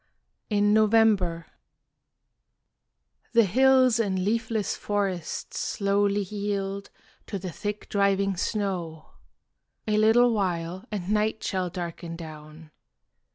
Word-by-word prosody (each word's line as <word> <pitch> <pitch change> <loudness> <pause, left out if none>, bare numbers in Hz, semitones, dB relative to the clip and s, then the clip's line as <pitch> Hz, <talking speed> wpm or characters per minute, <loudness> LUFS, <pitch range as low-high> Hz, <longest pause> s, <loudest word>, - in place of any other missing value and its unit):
IN 205 -1 +3
NOVEMBER 210 -6 +3 1.9
The 230 -1 +6
hills 255 +2 +4
and 190 -4 0
leafless 220 0 -1
forests 195 -5 -3
slowly 200 0 +1
yield 200 0 -3 0.4
To 200 - -4
the 185 -1 -6
thick 205 +4 -5
driving 200 -1 +1
snow. 175 -5 -3 0.8
A 210 0 +2
little 230 +2 +5
while 180 -1 -2
And 200 -2 -3
night 215 +1 0
shall 185 -2 -1
darken 170 -1 -6
down. 155 -1 -11
200 Hz, 100 wpm, -26 LUFS, 180-215 Hz, 1.9 s, The